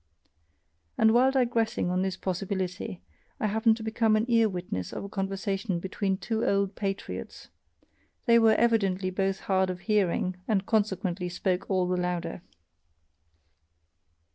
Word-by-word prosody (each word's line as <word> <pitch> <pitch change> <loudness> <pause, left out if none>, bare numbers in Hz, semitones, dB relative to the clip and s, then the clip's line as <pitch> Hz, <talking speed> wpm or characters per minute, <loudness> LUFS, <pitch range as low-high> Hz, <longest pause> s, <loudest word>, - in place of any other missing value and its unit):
And 220 0 +5
while 250 +2 +5
digressing 235 -7 +1
on 180 +1 +1
this 190 -1 -2
possibility, 185 - -3 0.4
I - - -1
happen 220 +2 +3
to 225 - -8
become 220 0 +2
an 215 +1 +2
ear 230 -2 +4
witness 175 - -4
of - - -5
a 200 - -7
conversation 195 -1 -2
between 190 +1 -2
two 220 +2 -2
old 200 0 +1
patriots 195 -1 -5 0.8
they 235 -2 +6
were 220 -1 +5
evidently 195 -5 +2
both 195 0 -1
hard 190 -1 +1
of 180 -1 -5
hearing 190 -3 +1
and 205 -3 +1
consequently 190 -4 0
spoke 180 +1 -2
all 185 -2 +1
the 180 0 0
louder. 175 -1 -2
195 Hz, 140 wpm, -28 LUFS, 185-220 Hz, 0.8 s, they